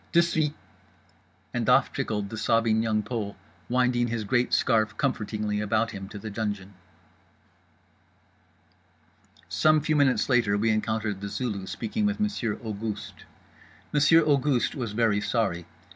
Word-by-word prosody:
De 170 0 +6
suite!_" 155 -3 0 1.0
And - - -1
off - - +4
trickled 105 -2 -2
the - - -4
sobbing 115 0 +2
Young 110 -2 0
Pole, 105 -2 -4 0.3
winding 125 -1 +2
his 115 -1 -2
great 120 +3 +1
scarf 110 -3 +2
comfortingly 105 -5 -1
about 110 +2 0
him, 95 -2 -7
to 105 - -8
the 110 +1 -7
dungeon. 100 -2 -4 2.7
Some 155 - +3
few 155 +1 0
minutes 140 -3 +3
later 120 -6 +2
we 110 +2 +2
encountered 110 -2 -1
The 100 - -4
Zulu 100 -5 -3
speaking 110 - -2
with 205 +1 -2
Monsieur 205 - -1
Auguste. 110 -1 -6 0.7
Monsieur 155 +3 +5
Auguste 140 -4 +2
was 120 -7 -4
very 105 -2 +2
sorry. 95 -9 -1
110 Hz, 135 wpm, -26 LUFS, 105-130 Hz, 2.7 s, De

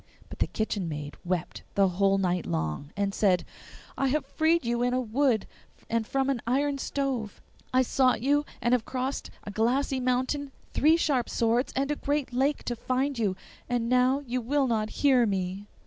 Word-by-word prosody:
But - - -9
the - - +2
kitchen 205 -5 -2
maid 150 -1 -5
wept 180 -1 -2
the 195 -1 +5
whole 195 +2 +2
night 180 -2 0
long, 80 - -2
and 200 -1 0
said, 185 -4 +2 0.5
'I 275 - +2
have 275 +1 0
freed 320 +1 +1
you 235 0 0
in 245 +1 +1
a - - +2
wood 245 -1 +1 0.5
and 230 -1 0
from 270 -1 0
an 245 -4 -2
iron 275 +3 +1
stove; 265 -7 -2 0.3
I 255 0 +4
sought 255 0 +2
you 285 +5 +2 0.2
and 240 0 +3
have 250 -3 +3
crossed 260 +3 -3
a 205 - -6
glassy 255 +6 +1
mountain, 260 +3 -1 0.2
three 315 +3 +4
sharp 275 -7 +1
swords, 235 +3 +1
and 275 +2 0
a - - +1
great 290 -3 -2
lake 275 +4 +1
to 240 - -2
find 255 +2 -1
you, 200 -4 +1 0.3
and 240 -1 0
now 255 +3 +3
you 250 0 -2
will 275 +4 +1
not 220 -3 0 0.2
hear 255 -4 +5
me! 190 0 -2
245 Hz, 185 wpm, -28 LUFS, 210-275 Hz, 0.5 s, the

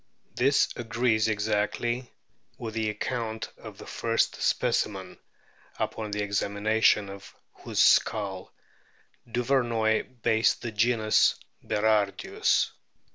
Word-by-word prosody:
This 140 +3 +3
agrees 115 -2 +1
exactly 110 +3 -1 0.5
with 115 -2 -6
the 110 -1 -1
account 110 +1 -4
of - - -11
the - - -11
first - - -1
specimen, 95 -3 -1 0.6
upon 110 -1 -3
the 105 0 -2
examination 100 +1 +1
of 100 0 -11 0.2
whose - - 0
skull 100 -4 +2 0.8
Duvernoy 120 -1 0
based 110 0 +2
the 120 - -3
genus 110 0 +3 0.3
Berardius. 105 -2 +1
110 Hz, 95 wpm, -27 LUFS, 105-120 Hz, 0.8 s, This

